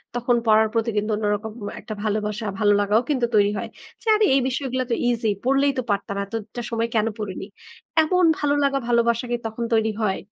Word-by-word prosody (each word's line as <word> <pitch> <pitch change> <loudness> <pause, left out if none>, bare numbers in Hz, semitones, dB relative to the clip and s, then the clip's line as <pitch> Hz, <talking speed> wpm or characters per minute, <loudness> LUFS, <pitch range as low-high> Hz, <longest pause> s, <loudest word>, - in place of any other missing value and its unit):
তখন 245 0 +1
পড়ার 220 0 +5
প্রতি 230 0 0
কিন্তু 210 +1 0
অন্যরকম 210 +1 -1 0.3
একটা 215 - -7
ভালোবাসা, 210 0 -2
ভালোলাগাও 205 +1 +3
কিন্তু 260 -5 +2
তৈরি 205 -1 +4
হয়। - - -5 0.3
যে - - -15
আরে 425 0 +3
এই - - +5
বিষয়গুলা 260 -1 -2
তো - - +3
ইজি 230 -2 0
পড়লেই 275 +2 +3
তো 255 - +1
পারতাম। 200 0 -2
এতটা 225 +3 -6
সময় 230 0 0
কেনো 225 0 +2
পড়িনি। 195 -2 -5 0.6
এমন 360 +3 +2
ভালোলাগা 285 -1 +1
ভালোবাসা 235 0 +2
কি - - +2
তখন 225 +1 -4
তৈরি 220 0 +2
হয়? 195 -3 +1
225 Hz, 180 wpm, -23 LUFS, 210-255 Hz, 0.6 s, পড়ার